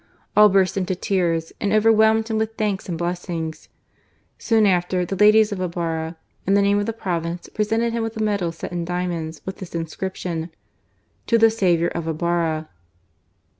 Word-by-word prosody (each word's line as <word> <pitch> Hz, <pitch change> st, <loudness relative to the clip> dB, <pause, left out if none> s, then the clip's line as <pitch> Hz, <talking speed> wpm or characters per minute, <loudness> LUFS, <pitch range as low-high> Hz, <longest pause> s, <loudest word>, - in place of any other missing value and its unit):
All 210 Hz, 0 st, +8 dB
burst 190 Hz, -1 st, +2 dB
into 185 Hz, -1 st, -1 dB
tears 170 Hz, -4 st, -1 dB
and 200 Hz, -, 0 dB
overwhelmed 220 Hz, +1 st, +4 dB
him 220 Hz, -1 st, -1 dB
with 220 Hz, 0 st, -2 dB
thanks 205 Hz, -4 st, -2 dB
and 170 Hz, -, -2 dB
blessings. 170 Hz, -2 st, -4 dB, 0.7 s
Soon 225 Hz, -3 st, +3 dB
after, 180 Hz, -1 st, +1 dB
the 195 Hz, -, -3 dB
ladies 210 Hz, +2 st, +5 dB
of 195 Hz, -2 st, -3 dB
Ibarra, 165 Hz, -2 st, -3 dB, 0.3 s
in 195 Hz, -, +4 dB
the 200 Hz, -, +4 dB
name 200 Hz, +1 st, +3 dB
of 205 Hz, -, -2 dB
the -, -, 0 dB
province, 175 Hz, -5 st, -4 dB
presented 225 Hz, +2 st, 0 dB
him 235 Hz, -, -1 dB
with 225 Hz, 0 st, -4 dB
a 220 Hz, -, 0 dB
medal 200 Hz, -5 st, 0 dB
set 165 Hz, -, -7 dB
in 175 Hz, -1 st, -2 dB
diamonds 170 Hz, -3 st, -3 dB
with 190 Hz, -, -5 dB
this 180 Hz, -3 st, -9 dB
inscription: 170 Hz, 0 st, -4 dB, 0.4 s
" -, -, -43 dB
To 230 Hz, -, +4 dB
the 225 Hz, 0 st, +5 dB
saviour 175 Hz, -6 st, +2 dB
of 165 Hz, -1 st, -5 dB
Ibarra." 160 Hz, -1 st, -1 dB
185 Hz, 175 wpm, -22 LUFS, 170-210 Hz, 0.7 s, All